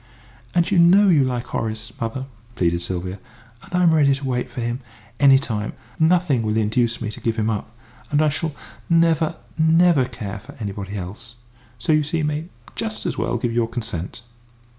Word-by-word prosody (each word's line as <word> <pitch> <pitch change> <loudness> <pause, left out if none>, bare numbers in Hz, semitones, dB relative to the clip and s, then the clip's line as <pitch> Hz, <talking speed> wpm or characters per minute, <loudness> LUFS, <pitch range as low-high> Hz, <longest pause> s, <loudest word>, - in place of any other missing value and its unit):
"And 175 +1 +2
you 190 - +4
know 190 +4 +6
you 155 -6 +5
like 125 -2 -2
Horace, 110 0 -4
mother!" 115 +3 -3 0.3
pleaded 85 -1 +1
Sylvia. 90 +2 -3 0.4
"And - - -7
I'm 175 -2 +4
ready 140 -3 +4
to 140 0 -6
wait 125 -1 -1
for - - -7
him, 120 +1 -2 0.4
any 135 -1 +7
time. 110 -6 -3 0.3
Nothing 160 -5 +3
will 110 0 0
induce 115 +2 +1
me 110 -2 -3
to - - -9
give 115 -1 0
him 110 0 0
up, 105 0 -3 0.4
and 145 - +2
I 155 0 +4
shall 150 +1 -3 0.3
never, 165 -1 +3 0.2
never 160 -3 +5
care 105 -5 -6
for - - -13
anybody 100 -1 -5
else. 100 +6 -7 0.4
So 120 +7 +1
you 155 - +4
see 150 +3 -2
you 155 - 0
may 150 +1 -2 0.3
just 220 -1 -3
as - - -2
well 120 - 0
give 120 0 -1
us - - -5
your 120 -1 +2
consent!" 115 -4 -5
125 Hz, 190 wpm, -22 LUFS, 110-160 Hz, 0.4 s, any